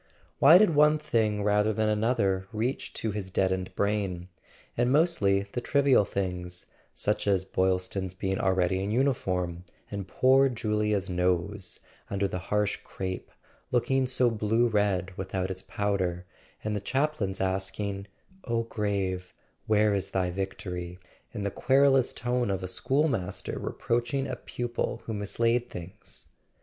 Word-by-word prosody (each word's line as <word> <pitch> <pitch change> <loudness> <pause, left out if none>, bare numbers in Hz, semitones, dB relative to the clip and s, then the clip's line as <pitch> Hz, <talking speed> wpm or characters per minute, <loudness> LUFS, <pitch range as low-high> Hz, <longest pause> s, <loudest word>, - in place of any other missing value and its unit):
Why 155 +6 +9
did 210 -2 +5
one 150 +1 +5
thing 110 -9 0
rather 105 +1 +3
than 110 +1 +1
another 105 -3 +1
reach 115 +4 -2
to 110 - -2
his 100 -2 -5
deadened 95 0 0
brain, 100 -4 -1 0.5
and 120 +1 +2
mostly 135 - +3
the 125 - -3
trivial 140 -6 +4
things, 90 -3 -4 0.3
such - - -1
as 95 -2 +2
Boylston's 95 0 -1
being 95 +1 -2
already 95 0 +1
in 100 - -2
uniform, 90 -9 0 0.3
and 100 -2 -4
poor 135 +6 +4
Julia's 105 -4 0
nose, 90 +2 -1 0.3
under 100 0 0
the 90 - -4
harsh 105 +2 0
crape, 95 -1 -5 0.4
looking 130 +2 +2
so 125 -1 +3
blue 115 +2 +2
red 95 -4 0
without 95 0 -2
its 95 0 -6
powder, 95 -3 -1 0.4
and 105 0 -1
the 105 - -2
chaplain's 130 -5 -1
asking 95 +1 -2 0.4
"O 115 -1 0
grave, 100 -5 -2 0.3
where 105 -1 +4
is 100 -2 -1
thy 90 -2 0
vic¬ 95 +1 -3
tory?" 90 -1 -6 0.3
in 105 -4 -5
the 100 - -1
querulous 135 +1 +4
tone 125 -2 -1
of 95 -1 -2
a - - -2
schoolmaster 130 - -1
re¬ - - -5
proaching 120 +3 0
a 125 - -3
pupil 120 0 -4
who 110 - -4
mislaid 115 +4 0
things? 90 +1 -9
100 Hz, 145 wpm, -28 LUFS, 95-120 Hz, 0.5 s, Why